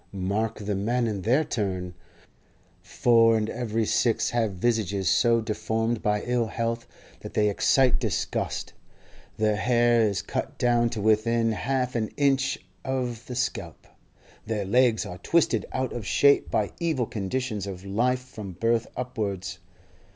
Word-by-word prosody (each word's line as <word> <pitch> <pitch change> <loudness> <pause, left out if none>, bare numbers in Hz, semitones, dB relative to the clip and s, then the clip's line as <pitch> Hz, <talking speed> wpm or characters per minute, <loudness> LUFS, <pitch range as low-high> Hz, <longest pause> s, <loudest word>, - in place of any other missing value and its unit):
Mark 100 +4 -1
the 105 -1 -3
men 120 +5 0
in 105 -4 -2
their 125 +10 +3
turn: 95 -8 -3 0.9
four 115 +4 +4
in 110 -1 -1
every 115 -2 -2
six 115 +2 +1
have 115 -4 0
visages 100 -2 0
so 115 +3 +4
deformed 110 +1 -1
by 105 0 0
ill 120 -2 0
health 115 +1 -3 0.3
that - - -10
they 105 -1 +3
excite 130 +5 +3
disgust; - - -2 0.6
their 105 -1 +1
hair 120 0 +3
is 100 -4 +1
cut - - -4
down 120 -1 +2
to 115 -2 -5
within 115 +2 +2
half 125 +3 -1
an 110 -2 0
inch 135 -2 +2 0.3
of 125 -3 -3
the 125 - -5
scalp; 125 +2 -3 0.6
their 105 -3 -2
legs 115 0 +3
are 90 - -8
twisted 135 - +1
out 130 -1 -2
of 120 - -5
shape 140 0 +4
by - - 0
evil 160 -8 0
conditions 110 -1 -3
of 95 -1 -7
life 125 +6 +1
from 105 -7 -8
birth 115 +5 0
upwards. 100 -7 -4
115 Hz, 145 wpm, -26 LUFS, 105-125 Hz, 0.9 s, four